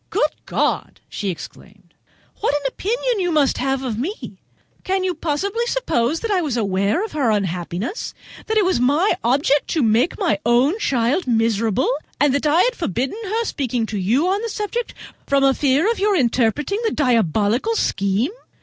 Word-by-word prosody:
"Good - - +1 0.2
God!" - - -1
she 200 - -3
exclaimed, 180 - -10 0.5
"what 400 - +1
an 290 - -1
opinion 475 - -1
you 355 -2 0
must 295 -4 +2
have 270 0 -1
of 230 -4 -3
me! 365 - -5 0.4
Can 380 0 0
you 370 -1 0
possibly 380 +9 -2
suppose 320 - 0
that 460 - -2
I 380 -3 +2
was 285 -7 -2
aware 200 - 0
of 445 - -9
her 280 -6 0
unhappiness! 190 - -2 0.3
that 440 - 0
it 420 - +4
was 370 -8 +1
my 290 +11 +3
object 275 +4 +2
to 315 -5 0
make 230 +7 +2
my 205 - +1
own 250 - +3
child 260 - 0
miserable, 225 0 +1 0.3
and 285 -2 +3
that 285 +2 +1
I 320 +5 +4
had - - +1
forbidden 265 - -2
her 445 +4 -1
speaking 250 - -1
to 215 -2 -4
you 240 - +2
on 390 +3 +1
the 460 - -3
subject 445 +3 -3 0.3
from 275 -1 +2
a 270 0 +5
fear 280 +6 +2
of 465 - -3
your 410 0 +2
interrupting 260 - +1
the 450 - +2
diabolical 235 - +1
scheme? 200 - 0
280 Hz, 175 wpm, -21 LUFS, 230-380 Hz, 0.5 s, a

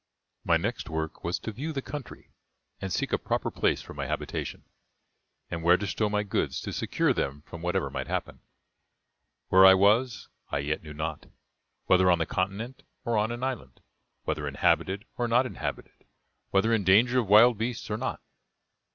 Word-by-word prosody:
My - - +3
next - - -3
work 80 0 -4
was 85 +3 -1
to 110 - -6
view 140 +9 -5
the 135 -3 -4
country, 145 -3 -8 0.5
and 95 - -5
seek - - -1
a - - +2
proper - - -2
place - - 0
for - - -10
my - - -4
habitation, - - -4 0.9
and 85 - -3
where 85 +2 +5
to 105 - -4
stow 105 +2 0
my 105 0 0
goods 100 - -1
to - - -5
secure - - +1
them 70 +2 -3
from 85 0 -10
whatever 90 +2 -1
might - - -4
happen. - - -3 1.1
Where 95 +1 +7
I 95 0 +9
was, 110 +5 +2 0.2
I 70 - -1
yet 75 +2 -2
knew 75 -1 -10
not; 80 0 -4 0.6
whether 95 0 +4
on 90 - +5
the 80 - 0
continent 100 +10 -3 0.2
or 120 -1 0
on 105 +2 +1
an 120 +1 -5
island; 120 - -4 0.4
whether - - -2
inhabited 100 +4 +1
or 120 - +1
not 120 +3 +3
inhabited; 130 - -6 0.4
whether 110 +4 +2
in 110 -3 +2
danger 115 +7 +5
of 115 - -1
wild 110 +2 +7
beasts 115 -1 -3
or 105 - 0
not. 130 +3 -4
100 Hz, 180 wpm, -28 LUFS, 90-120 Hz, 1.1 s, I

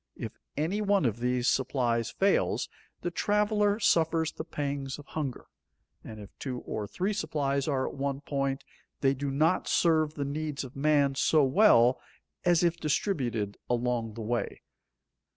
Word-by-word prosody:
If - - -7 0.2
any 170 +8 0
one 200 -5 +2
of 115 -1 0
these 125 0 0
supplies 120 -3 +1
fails, 195 +1 +1 0.3
the 175 - -2
traveler 210 +2 +1
suffers 165 -5 +2
the - - -6
pangs 140 -4 -4
of 145 - -12
hunger, 145 -6 -4 0.6
and 110 - -9
if 100 -2 -11
two 125 -3 -4
or 105 -1 -4
three 185 - -2
supplies 145 -7 -1
are 135 -3 0
at - - -6
one 140 0 -3
point, 135 -2 -2 0.4
they 135 -1 +3
do 140 +1 -3
not 155 +6 +1
serve 155 -3 +2
the 140 - -2
needs 150 0 -3
of 130 -1 -10
man 140 -1 +3
so 155 +2 +3
well 130 - +5 0.4
as 175 -1 +3
if 170 -1 +2
distributed 130 - -1
along 120 -2 -1
the 115 - -6
way. 120 +2 -3
140 Hz, 155 wpm, -29 LUFS, 125-165 Hz, 0.6 s, well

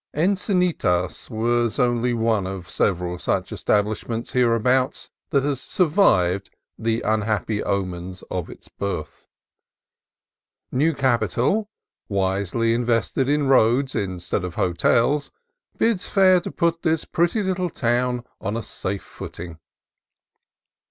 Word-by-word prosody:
Encinitas 180 - 0 0.4
is 110 - -7
the - - +2
only 120 0 +1
one 110 -4 +1
of 95 -2 -6
several 90 0 -1
such - - -1
settlements 110 +2 -1
hereabouts 125 +1 +1 0.2
that 140 -1 +2
has 140 -2 -1
sur 180 - +1
vived 100 - +3 0.3
the 115 +1 -1
unhappy 110 -1 0
omens 90 -2 -3
of 90 -3 -3
its - - -12
birth. 100 -6 -5 1.4
New 155 +5 +2
capital, 130 - +1 0.4
wisely 100 +3 0
invested 120 +2 0
in 145 0 +2
roads 130 +1 +3
instead 90 -3 -2
of 90 -1 -5
hotels, 115 - +2 0.5
bids 225 -5 +1
fair 185 -2 +5
to - - -6
put 170 -1 0
this 160 -1 0
pretty 175 +6 +1
little 185 -1 -1
town 125 -1 0 0.2
on 105 +3 -3
a 115 - -4
safe 100 0 -4
footing. 85 -1 -9
115 Hz, 120 wpm, -23 LUFS, 95-145 Hz, 1.4 s, fair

